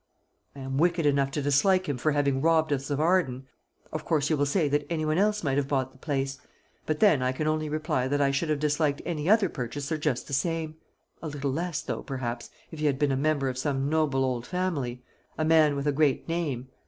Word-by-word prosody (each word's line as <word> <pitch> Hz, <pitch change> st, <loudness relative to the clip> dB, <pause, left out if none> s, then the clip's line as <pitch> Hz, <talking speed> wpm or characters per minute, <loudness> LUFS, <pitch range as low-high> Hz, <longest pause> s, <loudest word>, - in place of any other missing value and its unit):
"I 140 Hz, -, -9 dB
am 135 Hz, +1 st, -3 dB
wicked 170 Hz, -1 st, +2 dB
enough 140 Hz, -1 st, +2 dB
to 140 Hz, +1 st, -3 dB
dislike 185 Hz, +7 st, +3 dB
him 140 Hz, -4 st, -2 dB
for 155 Hz, +3 st, +1 dB
having 140 Hz, -2 st, +1 dB
robbed 160 Hz, -1 st, +3 dB
us 140 Hz, +1 st, -3 dB
of 145 Hz, 0 st, -1 dB
Arden. 155 Hz, -6 st, +1 dB, 0.5 s
Of -, -, -4 dB
course 150 Hz, -2 st, 0 dB
you -, -, +4 dB
will 145 Hz, -1 st, +1 dB
say 155 Hz, +2 st, +1 dB
that 145 Hz, 0 st, 0 dB
any 160 Hz, -2 st, -1 dB
one 155 Hz, +3 st, +1 dB
else 210 Hz, 0 st, +1 dB
might 135 Hz, -2 st, 0 dB
have 140 Hz, -1 st, 0 dB
bought 130 Hz, -2 st, -1 dB
the 130 Hz, -, -21 dB
place. 135 Hz, -2 st, -2 dB, 0.5 s
But 155 Hz, -1 st, -1 dB
then 195 Hz, -11 st, +5 dB
I 130 Hz, 0 st, +1 dB
can 140 Hz, +4 st, -3 dB
only 155 Hz, 0 st, 0 dB
reply, 155 Hz, -4 st, -1 dB
that 145 Hz, +2 st, 0 dB
I 140 Hz, -1 st, +3 dB
should 145 Hz, +4 st, -1 dB
have 155 Hz, -, +1 dB
disliked 150 Hz, 0 st, 0 dB
any 160 Hz, -1 st, -2 dB
other 215 Hz, -2 st, +5 dB
purchaser 145 Hz, +3 st, -4 dB
just 150 Hz, -5 st, -1 dB
the 140 Hz, -, -8 dB
same; 160 Hz, +2 st, -1 dB, 0.4 s
a 165 Hz, -, -5 dB
little 145 Hz, -2 st, -3 dB
less 170 Hz, 0 st, -2 dB
though, -, -, -4 dB
perhaps, 120 Hz, -3 st, -5 dB, 0.2 s
if 160 Hz, -, -8 dB
he 155 Hz, -, +1 dB
had 140 Hz, -2 st, +1 dB
been 145 Hz, 0 st, +1 dB
a -, -, +1 dB
member 140 Hz, 0 st, +1 dB
of 130 Hz, -1 st, -3 dB
some 135 Hz, 0 st, -1 dB
noble 150 Hz, -4 st, +1 dB
old 125 Hz, -2 st, -2 dB
family 145 Hz, -10 st, -2 dB, 0.3 s
a 155 Hz, -, 0 dB
man 155 Hz, -2 st, +4 dB
with 140 Hz, 0 st, -3 dB
a 145 Hz, -, +3 dB
great 145 Hz, -1 st, +1 dB
name. 145 Hz, -7 st, -2 dB
145 Hz, 235 wpm, -27 LUFS, 135-160 Hz, 0.5 s, then